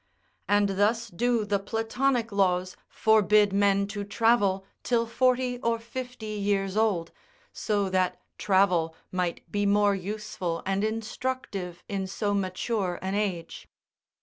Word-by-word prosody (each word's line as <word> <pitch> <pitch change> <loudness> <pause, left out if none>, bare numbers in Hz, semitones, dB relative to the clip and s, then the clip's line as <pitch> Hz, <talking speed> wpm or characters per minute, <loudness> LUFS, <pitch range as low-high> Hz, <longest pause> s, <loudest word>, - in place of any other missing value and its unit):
And 205 0 +3
thus 225 +3 +2
do 235 +3 +1
the 205 -1 0
platonic 230 +3 0
laws 185 -2 +1
forbid 210 -2 +4
men 200 0 +3
to 205 0 -4
travel 200 -2 +2 0.2
till 235 -1 +1
forty 250 +1 +1
or 230 -1 0
fifty 235 -2 -6
years 200 -1 0
old, 210 -7 +1 0.4
so 205 -2 0
that 185 -1 0 0.2
travel 180 -5 +2 0.2
might 180 -2 -3
be 205 0 +1
more 205 0 +4
useful 195 -3 -4
and 195 +1 0
instructive 220 -4 -3
in 195 -1 -3
so 205 +2 -1
mature 190 0 -1
an 190 +1 -2
age. 190 -5 -3
205 Hz, 125 wpm, -27 LUFS, 190-225 Hz, 0.4 s, forbid